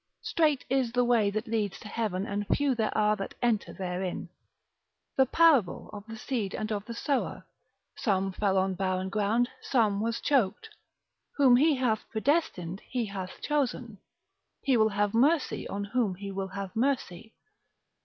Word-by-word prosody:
Strait 300 -5 +1
is 260 -3 0
the 245 0 +3
way 230 -4 +3
that 215 +3 -3
leads 215 -4 -2
to 215 - -10
heaven, 205 -3 -2
and 205 0 -3
few 285 -2 +2
there 220 -3 -1
are 210 0 +3
that 195 -2 -6
enter 235 -4 0
therein. 180 -1 -4 0.9
The 265 -1 +4
parable 280 - +3
of 205 +1 -9
the 225 0 -7
seed 220 -5 -3
and 215 0 -3
of 205 -1 -2
the 235 - -7
sower, 275 +3 -2 0.5
some 195 -4 0
fell 195 0 0
on 190 0 +2
barren 185 0 -1
ground, 215 +4 +1
some 215 -6 +1
was 230 +1 -1
choked. 265 - +1 0.7
Whom 265 -4 +6
he 295 +4 +4
hath 245 -5 -1
predestinated 220 - 0
he 245 -2 -1
hath 190 -2 -7
chosen. 250 -7 -1 0.6
He 270 -3 +3
will 220 -1 +4
have 205 0 0
mercy 285 +6 +2
on 200 0 -3
whom 210 -2 0
he 200 +1 -6
will 195 0 -3
have 195 -1 -6
mercy. 225 -5 -1
220 Hz, 165 wpm, -29 LUFS, 195-250 Hz, 0.9 s, Whom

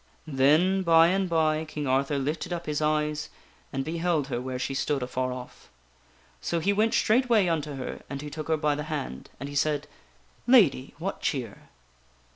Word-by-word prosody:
Then, 155 +7 +3
by 165 -1 +6
and 190 0 0
by, 155 -1 +2
King 155 -2 -5
Arthur 135 +2 +1
lifted 150 +6 -3
up 170 -1 -3
his 150 0 -2
eyes 150 0 0 0.4
and 135 -1 -2
beheld 165 -2 0
her 120 -2 -2
where 130 0 -4
she 130 +2 -3
stood 135 0 -1
afar 130 0 -2
off. 125 0 -9 0.7
So 170 - -1
he 200 +5 +1
went 220 +2 +2
straightway 230 -3 +3
unto 155 -4 -1
her 130 -1 -6
and 140 - -5
he 150 +1 -7
took 155 +1 -6
her 160 -1 +2
by 150 -1 +1
the 150 +1 -4
hand, 135 - -5
and 140 - -5
he 145 - -8
said: 145 0 +1 0.3
" - - -34
Lady, 65 - +2
what - - -4
cheer?" - - -3
150 Hz, 185 wpm, -27 LUFS, 135-165 Hz, 0.7 s, by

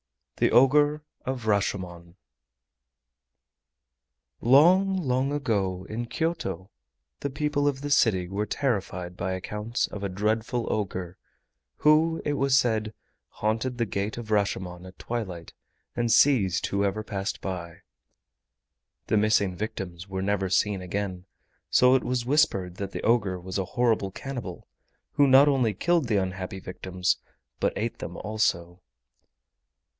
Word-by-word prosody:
THE - - +3
OGRE 145 +3 +4 0.2
OF 130 -3 -3
RASHOMON 90 -5 -2 2.2
Long, 180 +10 +5
long 135 -4 0
ago 100 -10 -1
in 120 +2 -4
Kyoto, 160 - -3 0.5
the 140 - -3
people 145 0 0
of 135 -2 -1
the 145 0 -4
city 105 -10 +3
were 100 +3 -2
terrified 95 -9 -2
by 95 0 -2
accounts 105 +5 -2
of 100 - -8
a 100 - -1
dreadful 110 +5 -1
ogre, 95 -4 -3 0.6
who, 160 +2 +3
it 145 - +1
was 135 -1 +3
said, 110 -4 0 0.3
haunted 115 +4 -2
the 120 - +1
Gate 100 +1 -3
of 115 -2 -7
Rashomon 95 -3 -1
at 95 - -14
twilight 95 -8 -5 0.4
and 120 -1 0
seized 105 -9 +4
whoever 100 +1 -1
passed 100 -1 -4
by. 85 -3 -6 1.2
The 110 - +1
missing 105 -3 +2
victims 95 -3 -5
were 95 0 -3
never 100 -1 0
seen 95 +1 +1
again, 90 0 -4 0.4
so 125 0 +5
it 130 - +3
was 125 -1 -1
whispered 100 - +1
that 100 -1 -4
the - - -6
ogre 105 -6 +2
was 95 +2 -4
a 95 - -1
horrible 115 -3 +1
cannibal, 120 -3 -7 0.4
who 145 - +4
not 135 +2 +7
only 125 -7 +2
killed 170 - +1
the 110 -3 +2
unhappy 95 0 -3
victims 90 0 -2 0.4
but - - +1
ate - - -3
them - - -6
also. 90 -5 -1
105 Hz, 135 wpm, -26 LUFS, 95-130 Hz, 2.2 s, not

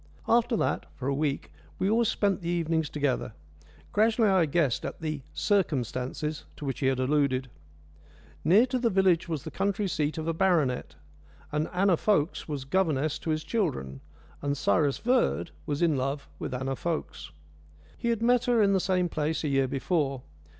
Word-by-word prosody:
After 235 0 +3
that, - - -1
for 130 - -5
a 140 - +1
week, 140 0 -2 0.3
we 190 - 0
always 225 +2 +3
spent 200 -2 +1
the 170 - -3
evenings 165 -2 0
together. 140 -6 -1 0.6
Gradually 220 +1 +3
I 185 -4 +4
guessed 145 -5 +1
at - - -5
the 155 -3 -3
"circumstances" 150 - -1
to 150 - -7
which 135 - -3
he 135 - +1
had 130 -1 +1
alluded. 130 -1 +1 0.9
Near 195 - +6
to 255 0 -1
the 235 -1 +2
village 185 -4 +3
was 155 -5 -3
the - - -7
country 200 +1 0
seat 155 -3 -1
of 160 0 -3
a 165 - +1
baronet, 160 -8 +1 0.6
and 150 +1 -1
Anna 185 -1 +3
Fokes 180 -6 +1
was 145 -4 -4
governess 155 -3 +1
to - - -5
his 155 0 0
children, 130 - -2 0.4
and 145 0 -1
Cyrus 145 0 +2
Verd 245 -8 +1 0.2
was 145 +3 -1
in 165 -3 +3
love 135 +2 -2
with - - -4
Anna 130 +1 -2
Fokes. 165 - -4 0.7
He - - -4
had 230 -1 0
met 245 0 +3
her 245 -2 +3
in 200 -2 +4
the 190 - +3
same 185 -1 +1
place 155 0 -2
a 150 - 0
year 135 -1 +2
before. 135 -1 -1
160 Hz, 180 wpm, -28 LUFS, 140-195 Hz, 0.9 s, Near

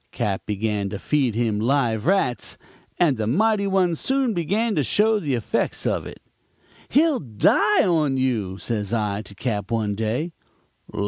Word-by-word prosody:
Cap. 100 -2 -3
began 105 -1 -1
to 100 - -5
feed 130 -1 0
him 115 -3 0
live 120 -1 +1
rats, 130 - 0 0.4
and 155 -8 +3
the 110 -1 -2
mighty 205 - +2
one 190 -3 +2
soon 260 - 0
began 205 +6 0
to 155 - +1
show 210 - +2
the 145 -8 -1
effects 115 - -2
of - - -1
it. - - -12 0.7
"'He'll 295 +1 +3
die 130 - +3
on 155 -7 +1
you,' 110 -8 -1
says 105 -1 -3
I 105 -2 -1
to 100 -1 -13
Cap. 105 -2 -3
one 110 -3 0
day. 115 - -2
125 Hz, 155 wpm, -23 LUFS, -, 0.7 s, and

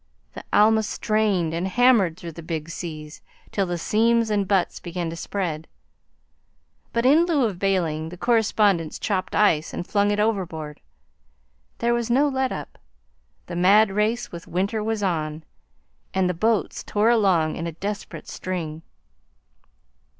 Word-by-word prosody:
The - - -8
Alma 220 +1 +5
strained 210 -5 0
and 170 +3 -1
hammered 210 -6 +3
through 170 -2 -7
the 170 - -10
big 160 -1 -5
seas 155 -3 -7 0.3
till 195 -2 0
the 175 0 -2
seams 230 +4 +2
and 200 -2 +1
butts 195 -3 +1
began 175 -1 -4
to - - -6
spread, 165 -3 -4 1.2
but 235 +1 0
in 300 +6 +6
lieu 295 -7 +2
of 195 -6 -3
bailing 165 -5 0
the 180 - -10
correspondents 210 -7 +2
chopped 190 -3 -2
ice 170 -7 +2
and - - -4
flung 205 +1 +1
it 205 0 0
overboard. 175 -9 -2 1.0
There 235 0 +1
was 235 0 -1
no 270 +5 +4
let 265 -2 0
up. - - -7 0.7
The 175 - -7
mad 195 +4 +5
race 215 +4 0
with 170 -1 -9
winter 200 +5 -1
was 220 -1 -2
on, 155 -4 -2 0.7
and 190 -1 +2
the 180 - 0
boats 215 +5 0
tore 215 +3 +2
along 185 -9 +2
in 165 - -4
a - - -3
desperate 200 +5 -6
string. 165 -4 -5
195 Hz, 150 wpm, -24 LUFS, 170-220 Hz, 1.2 s, in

